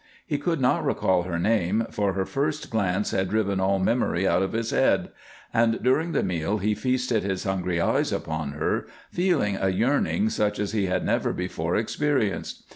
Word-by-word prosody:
He 145 -3 -2
could 165 +1 -1
not 125 -1 +2
recall 95 -1 +1
her 85 -2 -2
name, 105 +3 +1
for 100 -2 0
her 95 0 -1
first 150 +4 -2
glance 100 -2 0
had 95 -1 0
driven 100 -3 0
all 95 +1 +2
memory 95 -2 +1
out 85 +1 +3
of 95 - -1
his 115 0 -1
head, - - +2 0.4
and 115 0 +2
during 155 +7 +2
the - - +1
meal 90 +4 -1
he 105 +1 0
feasted 125 +1 0
his 95 -1 -2
hungry 90 -3 -1
eyes 85 - +1
upon 80 -2 -3
her, 75 - -1 0.2
feeling 170 - +1
a 95 - +1
yearning 140 - +1
such 105 - 0
as 105 -1 -2
he 105 -3 0
had 90 - -1
never - - +1
before 90 -2 -2
experienced. 115 -1 -1
105 Hz, 185 wpm, -25 LUFS, 95-120 Hz, 0.4 s, out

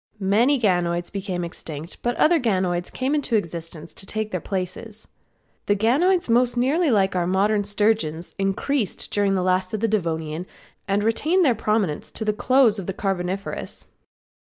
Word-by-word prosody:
Many 225 +8 +3
ganoids 175 -5 0
became 190 -3 -3
extinct, 160 -1 -7
but 240 0 -1
other 330 +1 +4
ganoids 185 -7 0
came 260 +3 -1
into 290 -6 0
existence 165 -4 -4
to 195 - -7
take 215 +1 -3
their 180 - -2
places. 200 +3 -5 0.6
The 205 - +3
ganoids 300 - +2
most 245 +1 +3
nearly 290 +7 +2
like 195 -5 +2
our 175 -1 +1
modern 205 +3 +2
sturgeons 205 -6 0
increased 200 +4 -1
during 200 -1 +2
the 185 - 0
last 185 +2 +1
of - - -3
the 225 - +1
Devonian 165 -4 -2 0.4
and 200 +1 +1
retained 315 - +2
their 260 - +4
prominence 210 -7 -1
to 220 - -4
the 210 - +1
close 240 -1 +3
of 185 - -7
the 195 - -2
Carboniferous. 195 0 -3
205 Hz, 160 wpm, -23 LUFS, 180-230 Hz, 0.6 s, other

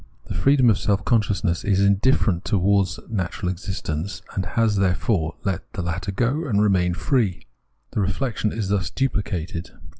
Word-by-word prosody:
The - - -6
freedom 135 -4 +4
of 100 - +1
seK 100 0 0
consciousness 105 -7 +1
is 95 -2 +2
indifferent 100 -1 +3
towards 95 -3 +1
natural 90 -4 -2
existence, 90 -2 -4
and 95 -2 -2
has, 110 +1 +1
therefore, 90 -2 +1
let 95 -2 -3
this 90 -4 -3
latter 90 +3 -2
go 125 - 0
and 105 -6 +1
remain 95 -4 +2
free. 110 -6 0 0.5
The - - -1
reflexion 110 +2 -1
is 105 -4 -3
thus 100 -3 0
duphcated. 90 -10 -2
100 Hz, 150 wpm, -23 LUFS, 90-110 Hz, 0.5 s, freedom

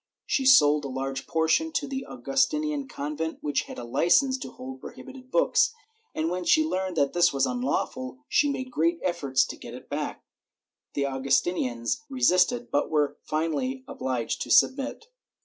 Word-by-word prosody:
She 265 -2 +1
sold 150 - +6
a - - -3
large 135 0 -4
portion 165 - +1
to 290 - -1
the 270 -1 -5
Augustinian 280 - 0
convent, 150 - -4
which 145 -2 -1
had - - -9
a 120 - -6
licence 180 - +3
to - - -6
hold 130 0 -9
prohibited 260 -1 -11
books, 465 - +3 0.4
and 155 - 0
when 180 0 -2
she 315 - +4
learned 185 - -2
that 140 -2 +2
this 175 0 +4
was 135 -1 +1
unlawful 255 +1 -2
she 290 - +3
made 260 -2 -4
great 170 -4 +1
efforts 145 -8 +1
to - - -7
get - - -10
it - - -12
back; - - -4 0.7
the 140 - +1
Augustinians 135 - 0
resisted 245 -1 +2
but 145 - +1
were 150 -2 +1
finally 165 - -2
obhged 130 - -3
to - - -4
submit. 275 +10 +3
175 Hz, 165 wpm, -26 LUFS, -, 0.7 s, sold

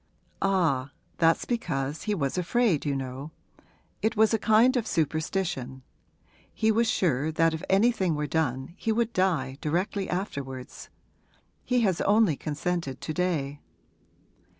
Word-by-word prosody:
'Ah, 165 -9 +1 0.3
that's 165 0 +3
because 150 - -2
he 210 - +2
was 140 -7 -1
afraid, 180 - +1
you 140 - 0
know; 135 +2 -5 0.7
it 220 0 0
was 220 +1 +4
a 225 - +2
kind 230 +5 +4
of 235 -3 0
superstition. 155 -5 -2 0.7
He 220 0 +1
was 225 +1 +2
sure 155 -3 +1
that 165 +1 +2
if 160 - -4
anything 195 -4 +3
were 150 0 -1
done 135 -2 -1
he 225 - -1
would 230 +1 0
die 150 -8 0
directly 185 +5 -1
afterwards. 140 -9 -5 0.7
He 250 -1 +1
has 190 -6 +1
only 205 -6 +4
consented 155 -1 -3
to 155 - -4
day.' 150 -5 -1
165 Hz, 135 wpm, -27 LUFS, 140-205 Hz, 0.7 s, was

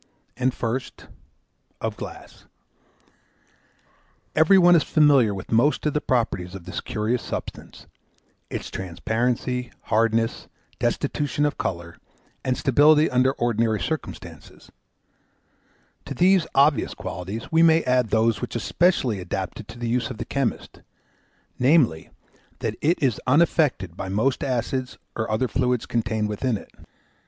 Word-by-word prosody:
And 130 +1 +1
first, 125 +2 -4 0.7
of - - -3
Glass: - - -10 1.9
every 160 +5 +6
one 175 -1 +6
is 165 - +5
familiar 145 -9 +4
with 95 -1 -7
most 120 +9 +2
of 150 - +1
the 150 - 0
properties 100 -7 -1
of 90 -3 -10
this - - -5
curious 110 +3 -2
substance; - - -7 0.6
its - - -5
transparency, 120 +7 -2 0.2
hardness, 115 +1 +1 0.3
destitution 145 0 -1
of 145 - -2
colour, 85 -1 -4 0.5
and 130 -1 0
stability 150 +3 +4
under 130 +1 +3
ordinary 115 -3 0
circumstances: 160 -1 -7 1.3
to 140 - -6
these 185 +3 +4
obvious 140 +1 +3
qualities 95 +7 -6
we 165 0 +4
may 165 0 +5
add 125 -3 +1
those 110 +1 +2
which 125 - -5
especially 125 - +1
adapt 95 +1 -4
it 110 - -9
to - - -11
the 120 0 -4
use 120 0 0
of 125 - -7
the 115 - -5
chemist, 135 -3 -3 0.8
namely, 125 - +3 0.5
that 110 - -3
it 165 +4 +2
is 125 -6 +1
unaffected 135 - +2
by 95 - -5
most 110 +7 0
acids 130 0 -2 0.2
or 110 - -2
other 110 +4 0
fluids 125 -1 0
contained 110 -2 -1
within 110 +2 -1
it. - - -14
125 Hz, 130 wpm, -24 LUFS, 110-145 Hz, 1.9 s, every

